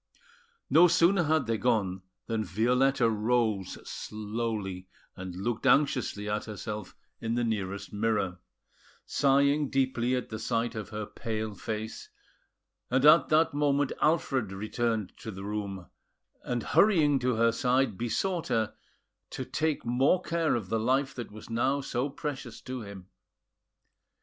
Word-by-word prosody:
No 175 +3 +7
sooner 175 +1 +4
had 155 -1 +2
they 115 -1 -1
gone 100 -7 +1 0.2
than 115 -1 -1
Violetta 120 - +2
rose 110 -3 0
slowly, 105 -3 -4 0.3
and 95 -1 -7
looked 115 +6 -2
anxiously 130 -6 +2
at 105 0 -2
herself 105 -1 -6 0.2
in 115 0 -2
the 120 - +1
nearest 100 -4 -3
mirror, 105 -4 0 0.7
sighing 140 +1 +3
deeply 130 -2 +1
at 125 - -3
the 110 - -5
sight 115 +1 -1
of 105 -3 -6
her 105 -1 -4
pale 110 0 -4
face; 110 +1 -5 0.8
and 130 +2 +2
at 155 +3 +7
that 155 0 +3
moment, 145 -1 +1
Alfred 135 - +1
returned 110 +1 -2
to - - -8
the 95 -2 -7
room, 100 -3 -4 0.6
and, 120 -2 -2
hurrying 155 -9 +4
to 125 -1 +1
her 115 +1 +3
side, 125 -1 +1
besought 165 - -1
her 110 -2 0 0.6
to - - -5
take 155 -4 -1
more 130 +9 +3
care 165 -4 +1
of 105 -6 -4
the 115 +1 +1
life 135 +4 +1
that 120 -3 -6
was 110 +1 -11
now 130 +5 +1
so 135 0 -2
precious 135 -4 -6
to 130 -1 -6
him. 100 -3 -9
115 Hz, 140 wpm, -29 LUFS, 105-135 Hz, 0.8 s, No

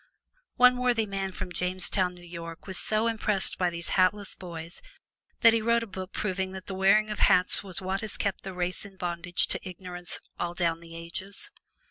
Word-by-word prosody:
One 250 0 +6
worthy 245 -3 +2
man 195 -1 -3
from 180 - -6
Jamestown, 180 +1 0
New 175 0 -14
York, 170 -1 -8
was 190 -2 -1
so 215 +1 +1
impressed 215 -5 +2
by 180 -1 +3
these 170 0 0
hatless 195 +2 +2
boys 170 -1 -8 0.6
that 230 -1 +8
he 230 - +2
wrote 235 +1 +2
a - - -4
book 190 -2 -7
proving 190 -2 -2
that 190 -1 -8
the 195 - -5
wearing 195 +3 +4
of 210 - -4
hats 180 +2 +5
was 190 -3 -5
what 190 +1 -2
has 215 -2 +1
kept 200 -2 -2
the 190 - -6
race 180 0 -1
in 195 -1 -12
bondage 175 0 0
to - - -2
ignorance 180 -1 -8 0.2
all 175 0 -2
down 170 -2 +1
the 165 0 -12
ages. 175 +4 -7
185 Hz, 195 wpm, -28 LUFS, 175-200 Hz, 0.6 s, that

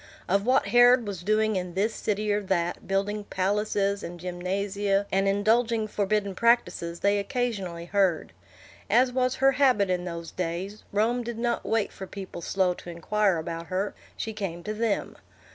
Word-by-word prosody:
Of 200 +4 +1
what 255 -5 +3
Herod 245 +1 +6
was 195 -4 -5
doing 215 +2 +2
in 180 -2 -3
this 210 +4 +1
city 210 0 -1
or 205 - 0
that, 180 -3 -1
building 200 +2 -1
palaces 200 +1 0
and 175 0 -7
gymnasia, 195 +3 -1
and 195 +1 +2
indulging 220 +3 +2
forbidden 205 -1 0
practises, 185 -6 +1
they 200 0 +3
occasionally 200 -7 -3
heard. 185 -3 +1 0.6
As 250 +3 +4
was 255 0 +1
her 270 +1 +4
habit 255 -9 +3
in 180 -1 -1
those 170 -1 -6
days, 185 +4 -4
Rome 225 +4 +1
did 235 -1 -5
not 235 0 -1
wait 225 -2 +1
for 190 - -8
people 190 -3 -8
slow 185 +1 +1
to 175 - -11
inquire 190 +3 +1
about 165 +1 -5
her; 190 +2 -2 0.2
she 220 - -4
came 185 -5 -5
to 215 - -3
them. 220 -1 -1
200 Hz, 165 wpm, -27 LUFS, 185-220 Hz, 0.6 s, Herod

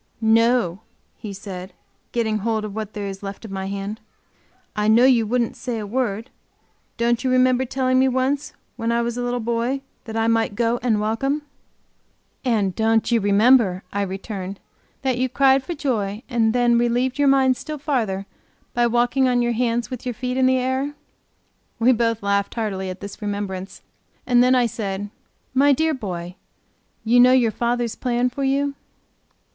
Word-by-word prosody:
"No," 225 -4 +3 0.4
he 210 - -8
said, 190 -2 -8 0.4
getting 220 -3 0
hold 220 0 -1
of 210 - -6
what 215 -1 -5
there 205 -1 -4
is 195 -1 -6
left 200 +2 -7
of 215 - -9
my 190 0 -4
hand. 200 +2 -4 0.8
"I 210 0 0
know 230 +3 +6
you 240 -4 +4
wouldn't 240 0 0
say 245 -3 -4
a 215 - -4
word. 225 0 -2 0.7
Don't 235 +1 +1
you 260 - +1
remember 255 0 +3
telling 255 0 +1
me 265 - +4
once 270 +3 0 0.2
when 230 -1 -1
I 235 0 +1
was 235 0 -2
a 245 - -3
little 245 0 -1
boy 235 +4 -1 0.2
that 220 -2 -7
I 225 - +1
might 225 -2 +1
go 235 +1 +1
and 225 -4 +1
welcome?" 270 +8 -1 1.0
"And 215 -7 +1
don't 225 +1 +2
you 230 -2 +3
remember," 205 -1 +4
I 200 - 0
returned, 195 0 -5 0.4
"that 260 -2 0
you 260 0 +1
cried 270 +1 +4
for 345 - -5
joy, 220 -7 -2
and 230 -3 +2
then 240 0 +3
relieved 245 +3 0
your 285 - +4
mind 265 -1 +4
still 305 +4 -6
farther 230 -10 -1 0.5
by 240 0 +3
walking 240 +3 +2
on 245 -1 +2
your 240 0 +1
hands 235 +1 -1
with 255 - -6
your 245 -2 -3
feet 250 +1 -3
in 260 0 +3
the 260 0 +3
air?" 260 +3 -1 0.8
We 240 +3 +4
both 230 -2 0
laughed 200 0 0
heartily 195 -5 -2
at 185 - -7
this 200 +1 -8
remembrance, 200 -2 -5 0.4
and 245 -1 +4
then 255 +1 +4
I 250 -1 +4
said: 205 -2 -4 0.4
"My 280 +2 +5
dear 315 +3 +1
boy, 180 - -6 0.7
you 235 +2 +4
know 250 +1 +7
your 240 -4 +4
fathers 235 0 -1
plan 245 0 0
for 275 +2 -4
you?" 280 +1 +1
235 Hz, 180 wpm, -22 LUFS, 210-255 Hz, 1.0 s, know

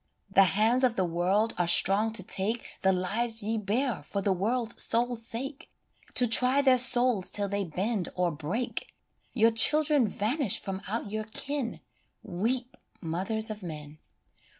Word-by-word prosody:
The 195 0 +5
hands 220 +8 +1
of 245 -3 +1
the 190 - -1
world 185 +6 -1
are 175 - 0
strong 205 +5 +3
to 225 - +1
take 210 +5 -2
The 190 - +2
lives 220 +5 0
ye 220 +2 -2
bear 215 - -2
for 200 +7 -6
the 195 0 0
world's 230 +5 0
sole 240 +1 0
sake, 235 +5 -6 0.5
To 250 - +5
try 250 +4 +2
their 260 -2 +4
souls 245 -5 +4
till 205 -1 +4
they 200 0 -3
bend 190 +4 -3
or 180 -1 -1
break: 165 +12 -5 0.4
Your 225 -1 +3
children 295 +2 +5
vanish 220 - 0
from 195 0 -6
out 220 -1 -4
your 215 0 -4
ken 270 +3 -5 0.4
Weep, 235 +6 -3 0.2
mothers 210 +6 -3
of 215 0 -8
men 150 -3 -9
220 Hz, 155 wpm, -27 LUFS, 190-240 Hz, 0.5 s, The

